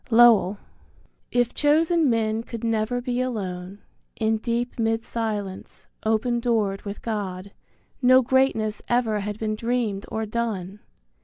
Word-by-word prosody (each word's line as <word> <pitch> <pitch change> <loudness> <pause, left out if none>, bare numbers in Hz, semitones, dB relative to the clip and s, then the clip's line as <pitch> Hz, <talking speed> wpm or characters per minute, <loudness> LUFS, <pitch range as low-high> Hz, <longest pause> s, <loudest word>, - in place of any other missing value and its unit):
Lowell. 225 -5 +6 0.7
If 245 -1 +1
chosen 315 +1 +3
men 225 -1 +1
could 230 0 -8
never 225 +2 0
be 250 0 -1
alone, 195 -5 -4 0.3
In 220 0 +1
deep 235 +2 -2
mid 225 0 +1
silence, 210 -4 -4 0.2
open 225 +2 +1
doored 220 -5 0
with 200 0 -7
God 200 -3 -4 0.5
No 255 0 +6
greatness 235 -4 +1
ever 235 -3 +2
had 205 +1 -4
been 215 -1 -2
dreamed 230 -3 -1
or 220 0 -2
done. 210 -4 -3
225 Hz, 130 wpm, -24 LUFS, 210-240 Hz, 0.7 s, Lowell